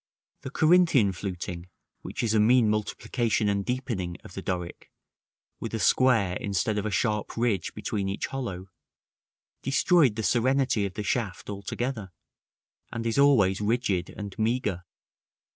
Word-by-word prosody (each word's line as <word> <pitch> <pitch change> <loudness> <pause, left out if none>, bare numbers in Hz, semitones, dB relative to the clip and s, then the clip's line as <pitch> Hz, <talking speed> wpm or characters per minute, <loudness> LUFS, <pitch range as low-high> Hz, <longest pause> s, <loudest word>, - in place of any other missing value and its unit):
The - - -6
Corinthian 155 - +4
fluting, 90 -2 -6 0.3
which - - -5
is 110 -2 +1
a 110 - +4
mean 115 0 +5
multiplication 105 +1 -1
and 100 -1 0
deepening 110 -8 -3
of - - -12
the 95 - -5
Doric, 90 -2 -5 0.7
with - - -4
a - - -2
square 115 -8 +3
instead 100 +2 -1
of 105 - -2
a - - -1
sharp 105 0 -1
ridge 115 -7 0
between 100 -2 -2
each 100 - -2
hollow, 100 -9 -5 0.9
destroyed 135 - +3
the 110 - -3
serenity 125 -2 +2
of 95 - -11
the 105 - -3
shaft 105 0 -2
altogether, 105 +1 -4 0.8
and 115 0 -4
is 115 +4 0
always 105 -9 +4
rigid 105 -5 0
and 100 -2 -8
meagre. 110 -5 -1
105 Hz, 145 wpm, -27 LUFS, 95-125 Hz, 0.9 s, mean